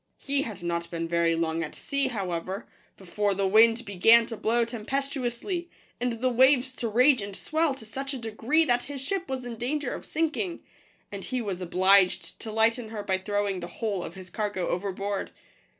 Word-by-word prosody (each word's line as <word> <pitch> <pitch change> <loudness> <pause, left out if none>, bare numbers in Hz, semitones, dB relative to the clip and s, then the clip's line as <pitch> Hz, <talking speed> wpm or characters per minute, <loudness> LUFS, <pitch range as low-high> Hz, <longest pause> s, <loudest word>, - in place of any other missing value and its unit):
He 280 0 -1
had 210 -9 -6
not 170 0 -2
been 165 -1 -3
very 170 0 +2
long 165 0 0
at 160 - -5
sea, 280 -1 -1
however, 190 -3 -3 0.3
before 200 +2 -1
the 195 0 0
wind 225 +4 +5
began 225 +4 +5
to 225 - -6
blow 230 +2 +1
tempestuously, 270 - -3 0.3
and 245 0 0
the 245 +3 0
waves 260 +1 +4
to 235 - -2
rage 250 +3 +4
and 200 -1 -6
swell 315 +2 0
to 225 - -13
such 270 +5 -5
a - - -3
degree 235 +7 +1
that 245 -3 +1
his 285 -1 -6
ship 365 +7 -3
was 260 -2 -3
in 235 -2 -6
danger 265 +3 -2
of - - -8
sink 320 0 0
ing; 360 -5 -3 0.5
and 200 -1 -6
he 255 - -2
was 195 -6 -3
obliged 185 +1 +3
to 220 - -6
lighten 225 +1 +2
her 215 -2 -5
by 190 -2 0
throwing 205 -1 -1
the 175 - -6
whole 205 -2 -3
of 165 - -8
his 185 -1 -10
cargo 205 -4 -2
overboard. 195 +2 -2
225 Hz, 195 wpm, -27 LUFS, 190-260 Hz, 0.5 s, wind